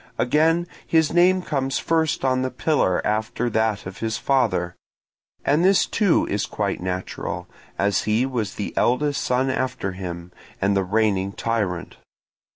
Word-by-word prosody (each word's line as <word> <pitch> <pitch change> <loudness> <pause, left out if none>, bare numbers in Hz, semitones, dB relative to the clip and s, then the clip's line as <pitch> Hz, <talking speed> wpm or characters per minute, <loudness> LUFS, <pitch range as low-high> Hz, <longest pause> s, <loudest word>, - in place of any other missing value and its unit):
Again, 160 +7 +2 0.2
his 160 -1 +2
name 180 +1 +4
comes 135 -4 -1
first 160 -4 0
on 130 -1 +2
the 130 - -1
pillar 125 - +1
after 110 +3 -1
that 110 -2 0
of 95 +1 -8
his 110 -1 -2
father; 90 -11 +1 0.7
and 150 +4 +3
this 190 +1 +4
too 200 -6 +2
is 100 - -1
quite 100 -4 -2
natural, 90 0 -4 0.3
as 100 0 +1
he 110 +4 +2
was 115 -6 -3
the 105 - -4
eldest 145 +4 +1
after 130 -5 0
him, 90 -2 -7 0.3
and 100 +1 +2
the 95 - +2
reigning 100 -1 +1
tyrant. 100 -8 -2
115 Hz, 145 wpm, -23 LUFS, 100-145 Hz, 0.7 s, name